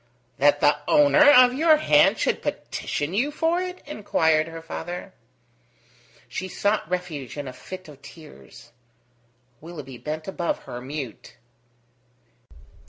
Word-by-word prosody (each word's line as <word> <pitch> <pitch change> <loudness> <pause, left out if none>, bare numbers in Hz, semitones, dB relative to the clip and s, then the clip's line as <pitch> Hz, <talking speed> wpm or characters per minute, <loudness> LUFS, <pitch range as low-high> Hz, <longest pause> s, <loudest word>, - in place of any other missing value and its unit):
"That - - +4
the - - +4
owner 295 -1 +6
of 250 -3 +7
your 310 +3 +4
hand 305 - +4
should - - 0
petition 145 +4 -4
you 245 +9 +1
for 325 +4 0
it?" 365 0 -6
inquired 160 - +1
her 165 0 -9
father. 175 +2 -7 1.1
She 185 - -5
sought 205 -1 -1
refuge 165 -8 -5
in 145 -1 -5
a 130 - -7
fit 185 +4 -10
of 145 -2 -14
tears. 145 -5 -15 0.9
Willoughby 150 -6 -9
bent 155 +1 -5
above 175 -3 -3
her, 120 - -8
mute. 135 -3 -8
175 Hz, 125 wpm, -24 LUFS, -, 1.1 s, of